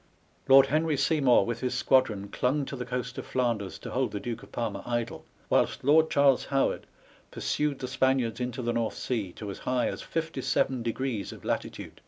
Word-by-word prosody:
Lord 135 0 +8
Henry 155 +1 +1
Sey 155 +3 +2
mour 125 -7 +5
with 115 -1 -3
his 125 0 -2
squadron 115 -6 +2
clung 135 +6 0
to 140 - -6
the 125 -2 -6
coast 125 0 -4
of - - -6
Flanders 115 -6 -1
to - - -8
hold 130 0 0
the 100 - -4
Duke 115 +1 -5
of - - -15
Parma 110 -4 -3
idle, 120 -1 -3 0.2
whilst - - +1
Lord 155 +4 +5
Charles 140 -2 +4
Howard 135 -1 0 0.4
pursued 150 -2 -1
the 130 - -5
Spaniards 130 -3 +1
into 125 +1 -3
the 120 0 0
North 115 -1 -1
Sea, 110 -8 -2
to 105 -2 -6
as - - -8
high 125 -1 0
as - - -5
57 135 -5 -1
degrees 115 -2 -2
of - - -12
latitude. - - -4
125 Hz, 195 wpm, -28 LUFS, 115-135 Hz, 0.4 s, Lord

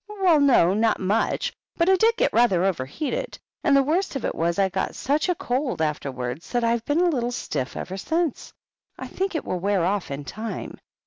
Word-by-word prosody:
"Well, 380 -7 +3
no, 250 -11 +5
not 220 +2 +2
much. 200 +4 0 0.2
But 335 - +2
I 380 - +6
did 450 +4 +3
get - - +1
rather 220 -7 +3
overheated; 195 - -2 0.3
and 285 -4 +4
the 275 - +4
worst 330 +4 0
of 270 - -3
it - - -1
was, 170 +1 -1
I 195 -1 +3
got 190 0 -3
such 295 +6 0
a 360 - +2
cold 255 - -2
afterwards 140 -3 -3
that 240 -1 +1
I've 230 0 +1
been 295 +4 +1
a 360 - +4
little 245 -6 -1
stiff 130 - -4
ever 190 +2 -5
since. 325 - -2 0.5
I - - -6
think 385 -2 -3
it 320 - -2
will 180 - -2
wear 195 -1 +1
off 195 0 -1
in 140 +1 -5
time. 220 +6 -6
235 Hz, 205 wpm, -24 LUFS, -, 0.5 s, I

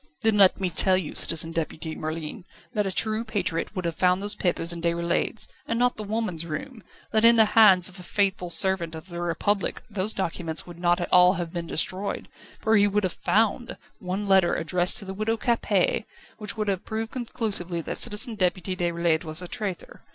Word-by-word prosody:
"Then 220 -1 +3
let 195 -2 +5
me 185 -2 -2
tell 185 +3 +3
you, 180 -5 -4
Citizen 165 0 +3
Deputy 160 -1 -4
Merlin, 155 +1 -6 0.3
that 210 -3 0
a - - -2
true 215 +3 +2
patriot 200 -4 -3
would 185 -2 -4
have 170 - -1
found 180 +2 +2
those 205 +1 +1
papers 175 -4 +1
in 170 - -7
Déroulède's, 170 +5 -1 0.2
and 230 - -1
not 245 +1 +2
the 215 - -4
woman's 210 -6 -2
room; 170 - -7 0.3
that 220 0 +1
in 235 0 +8
the 220 -1 +6
hands 195 -6 +6
of 185 0 -10
a - - -9
faithful 190 -1 -1
servant 170 -2 +4
of 160 +4 -10
the 175 0 -6
Republic 190 +4 -1
those 200 +1 -1
documents 165 -5 -3
would 175 -1 -12
not 175 0 +2
all 180 0 +6
have 175 -3 -5
been 170 -1 -4
destroyed, 185 +5 -2 0.3
for 220 0 +2
he 205 0 +4
would 205 +1 0
have 185 - -1
'found' 225 +3 0 0.2
one 190 +3 -4
letter 190 -3 +3
addressed 175 +2 -1
to 200 - -5
the 190 - -6
Widow 215 +3 -1
Capet, 250 - 0 0.3
which 210 -1 -3
would 215 -1 -2
have 195 -2 -1
proved 220 +1 -4
conclusively 210 -8 -2
that 165 - -5
Citizen 235 +1 +3
Deputy 185 -2 -1
Déroulède 170 -2 0
was 155 -1 -5
a 180 - -6
traitor. 200 -3 -6
185 Hz, 200 wpm, -25 LUFS, 170-215 Hz, 0.3 s, in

